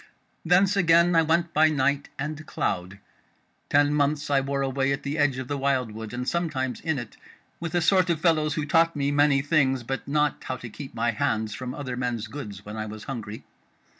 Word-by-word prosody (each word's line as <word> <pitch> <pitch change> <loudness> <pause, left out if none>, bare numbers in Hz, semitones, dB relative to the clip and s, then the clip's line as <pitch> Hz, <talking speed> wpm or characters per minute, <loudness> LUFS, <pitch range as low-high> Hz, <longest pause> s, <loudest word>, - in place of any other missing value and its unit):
Thence 185 +4 +4
again 170 -1 +4
I 165 - +6
went 170 +1 +1
by 155 +1 +5
night 140 -1 0
and 150 +2 -4
cloud. 90 +2 -2 0.7
Ten 145 0 +4
months 145 0 0
I 135 -1 +4
wore 140 0 -1
away 135 0 0
at 140 - -2
the 145 +2 -3
edge 140 -3 +2
of 130 -1 -5
the 145 0 -3
wildwood, 125 -6 -1
and 125 +1 -4
sometimes 155 -7 -1
in 160 -2 -1
it, 120 -3 -7 0.4
with 170 0 -4
a 175 - +3
sort 185 +2 +3
of 165 -3 +1
fellows 155 -3 +2
who 155 - -1
taught 165 +1 +3
me 140 -1 0
many 145 -1 +3
things, 135 -4 +2
but 135 +3 -4
not 150 0 0
how 130 - -3
to 120 -2 -9
keep 140 +2 -9
my 115 +1 +1
hands 110 -3 -1
from 125 +3 -5
other 130 -4 -5
men's 120 -3 -2
goods 105 -5 -8
when 105 +1 -7
I 110 0 -3
was 105 0 -8
hungry. 110 -5 -6
140 Hz, 205 wpm, -26 LUFS, 125-155 Hz, 0.7 s, I